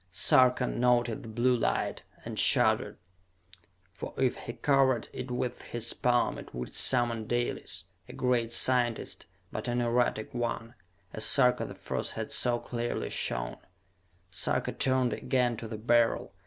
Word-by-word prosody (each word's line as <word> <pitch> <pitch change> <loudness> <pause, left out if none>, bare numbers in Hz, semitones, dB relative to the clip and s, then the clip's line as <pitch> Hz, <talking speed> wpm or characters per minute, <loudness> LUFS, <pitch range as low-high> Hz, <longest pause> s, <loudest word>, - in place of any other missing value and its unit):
Sarka 125 +7 +4
noted 120 +1 +1
the 120 - -10
blue 120 +3 +2
light, 115 - -1 0.2
and - - -4
shuddered. - - +3 1.0
For 95 - -8
if 130 -2 +1
he 120 - -7
covered 135 -4 +2
it 125 - -6
with 125 0 -3
his 120 0 -3
palm 120 -1 +1
it - - -12
would 60 0 -6
summon 120 -3 +3
Dalis, 120 -7 -2 0.3
a - - -9
great 120 -2 0
scientist, 120 -6 +1 0.2
but 110 - -5
an 120 0 0
erratic 120 -2 0
one, 120 -1 -3 0.4
as 110 - -2
Sarka 125 -3 +4
the - - -9
First - - -4
had - - -5
so 120 -1 +1
clearly 120 0 -4
shown. - - -2 0.7
Sarka 85 - -1
turned 130 -2 +1
again 125 -3 0
to 115 - -7
the 110 0 -6
Beryl. 115 -2 +1
120 Hz, 145 wpm, -29 LUFS, 115-125 Hz, 1.0 s, Sarka